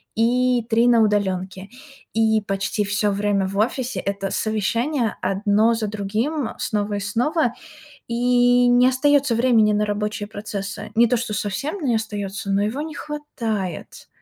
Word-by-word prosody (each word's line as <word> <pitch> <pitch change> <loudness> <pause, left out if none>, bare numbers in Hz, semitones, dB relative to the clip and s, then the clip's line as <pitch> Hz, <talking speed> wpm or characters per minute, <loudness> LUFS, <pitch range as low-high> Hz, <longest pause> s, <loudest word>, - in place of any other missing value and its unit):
и 245 +1 +2
3 230 +1 +3
на 235 -2 +5
удалёнке. 195 -2 -1 0.4
И 220 -1 +2
почти 195 +1 -2
всё 205 +1 0
время 200 -1 0
в 195 +1 -5
офисе- 250 +4 -1
это 195 0 -3
совещание 230 +4 -1
одно 205 +4 +2
за 225 -2 -2
другим, 220 +8 -2
снова 205 -1 -1
и - - -2
снова. 240 - 0 0.5
И 245 +1 +3
не 245 +1 +5
остаётся 275 -1 +2
времени 225 -3 +3
на 210 0 +1
рабочие 210 0 -3
процессы. 205 -2 -6
Не 235 +1 +5
то, 245 +1 +1
что 230 -2 -3
совсем 215 - -3
не 245 -4 +1
остаётся, 205 -3 -4
но 195 +1 +2
его 225 +8 -2
не 310 -1 -6
хватает. 225 - -5
220 Hz, 150 wpm, -22 LUFS, 205-245 Hz, 0.5 s, на